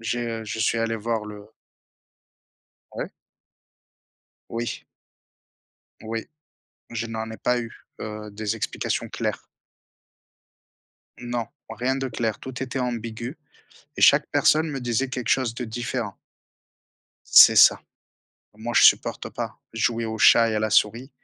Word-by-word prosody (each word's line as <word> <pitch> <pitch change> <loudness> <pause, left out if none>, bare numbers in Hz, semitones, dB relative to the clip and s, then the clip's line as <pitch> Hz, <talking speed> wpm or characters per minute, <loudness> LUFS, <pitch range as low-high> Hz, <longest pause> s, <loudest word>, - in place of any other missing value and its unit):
j'ai, 120 +1 -2
heu, 115 -1 -4
je 110 - -5
suis 110 +1 +1
allé 115 0 -1
voir 110 0 -2
le 105 -1 -10 1.5
Ouais? - - -5 1.4
Oui. 115 +1 -4 1.2
Oui. 115 0 -5 0.6
Je 115 0 -3
n'en 110 0 -5
ai 110 - -7
pas 125 0 0
eu, 115 - -6 0.3
heu, 105 -1 -6
des 105 0 -3
explications - - -3
claires. - - -4 1.8
Non, 120 -1 -3 0.2
rien 125 +4 -1
de 135 -1 -3
clair, 115 -3 -2
tout 130 0 -7
était 130 0 -4
ambigu. 120 +2 -4 0.6
Et - - -5
chaque - - +6
personne 155 +1 +3
me 135 -2 -4
disait 120 +2 -1
quelque 125 -3 -3
chose 125 -4 +1
de 125 - -3
différent. 115 -2 -4 1.2
C'est - - +9
ça. - - +7 0.8
Moi 120 +2 -5
je - - +6
supporte - - +4
pas. - - -6
Jouer 115 0 0
au 110 0 -4
chat 115 +1 +6
et 110 - -1
à 105 - +1
la 110 - 0
souris 115 +6 +2
115 Hz, 135 wpm, -24 LUFS, 110-120 Hz, 1.8 s, C'est